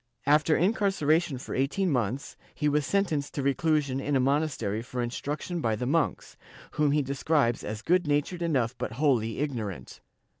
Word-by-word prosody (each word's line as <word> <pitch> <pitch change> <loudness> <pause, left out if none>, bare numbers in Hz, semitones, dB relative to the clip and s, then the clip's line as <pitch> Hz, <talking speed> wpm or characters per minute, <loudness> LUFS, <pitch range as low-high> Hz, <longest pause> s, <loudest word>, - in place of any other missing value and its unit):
After 150 +2 +4
incarceration 175 - +2
for 125 - -7
eighteen 165 +8 0
months, 125 +1 -2 0.2
he 150 - 0
was 150 0 +1
sentenced 160 -8 0
to 140 - -2
reclusion 140 -1 +1
in 145 +1 -1
a - - +4
monastery 130 -6 0
for 125 +1 -6
instruction 145 +8 -3
by 110 -4 +1
the 125 - -3
monks, 155 +5 -1 0.3
whom 150 -1 +1
he 150 0 +2
describes 140 -2 +1
as 105 +1 -5
good 180 -1 +2
natured 150 +4 0
enough 130 -8 0
but - - -3
wholly 120 -5 +1
ignorant. 110 - -4
145 Hz, 160 wpm, -28 LUFS, 125-155 Hz, 0.3 s, After